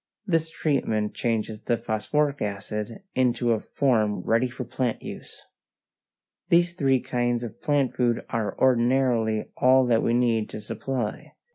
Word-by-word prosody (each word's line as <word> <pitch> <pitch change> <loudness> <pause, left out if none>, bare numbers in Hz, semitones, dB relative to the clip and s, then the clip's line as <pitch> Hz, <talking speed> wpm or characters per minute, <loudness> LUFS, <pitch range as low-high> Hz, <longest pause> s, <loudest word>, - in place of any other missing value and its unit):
This 165 -4 +1
treatment 110 -10 -1
changes 110 -2 -2
the 120 - 0
phosphoric 140 +8 -1
acid 105 - -4
into 125 -1 +1
a 110 - +2
form 110 -7 +1
ready 115 +3 +1
for 130 +1 -6
plant 125 -1 -2
use. - - -9 1.1
These 175 0 +4
three 135 -6 +2
kinds 120 -1 -1
of 115 0 -8
plant 145 -3 +1
food 120 -2 0
are 110 -4 -2
ordinarily 120 -3 +2
all 130 0 +5
that 115 -2 +3
we 115 - +1
need 115 -3 +1
to - - -6
supply. 115 +2 -4
120 Hz, 140 wpm, -25 LUFS, 110-130 Hz, 1.1 s, all